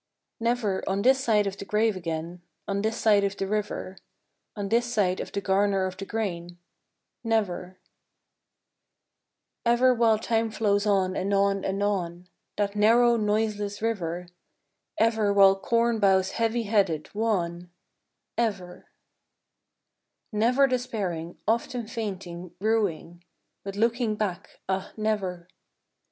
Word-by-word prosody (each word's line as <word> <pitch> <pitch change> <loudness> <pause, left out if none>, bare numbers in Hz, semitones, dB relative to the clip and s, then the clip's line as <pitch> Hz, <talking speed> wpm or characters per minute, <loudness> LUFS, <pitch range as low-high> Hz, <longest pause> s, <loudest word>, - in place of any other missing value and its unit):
EVER 230 -5 0
on 195 +1 0
this 265 +2 +4
side 210 -4 +3
of 195 0 -3
the - - -6
grave 215 +1 +1
again, 170 0 -5 0.3
On 200 0 -1
this 220 +2 -1
side 210 -3 +4
of 200 0 -1
the 195 - -1
river, 205 -2 -3 0.6
On 205 -2 -3
this 240 +2 +1
side 190 -5 +1
of - - -5
the 200 - -2
garner 195 0 +2
of 185 0 -4
the 195 0 -7
grain, 175 -6 -4 0.7
Never,— 185 -5 -1 1.9
Ever 245 +2 +4
while 230 -2 +3
time 225 +1 0
flows 210 -1 +1
on 190 -2 +2
and 195 +2 -1
on 195 0 +2
and 195 +1 -1
on, 180 -3 -2 0.3
That 205 0 -1
narrow 235 +3 +5
noiseless 210 -1 -1
river, 180 -6 -2 0.7
Ever 220 -2 +2
while 195 -1 +6
corn 230 +3 +1
bows 190 -2 +3
heavy 230 +1 0
headed, 195 -8 0
wan, 180 -5 -1 0.7
Ever, 190 -6 -3 0.7
— - - -55
Never 240 +6 +3
despairing, 205 -10 -3
often 235 +1 0
fainting, 185 -6 -6
ruing, 190 -5 -1 0.4
But 195 0 -6
looking 230 +1 +1
back, 200 -3 -4
ah 190 0 -2
never 195 -5 -2
205 Hz, 130 wpm, -26 LUFS, 190-225 Hz, 1.9 s, while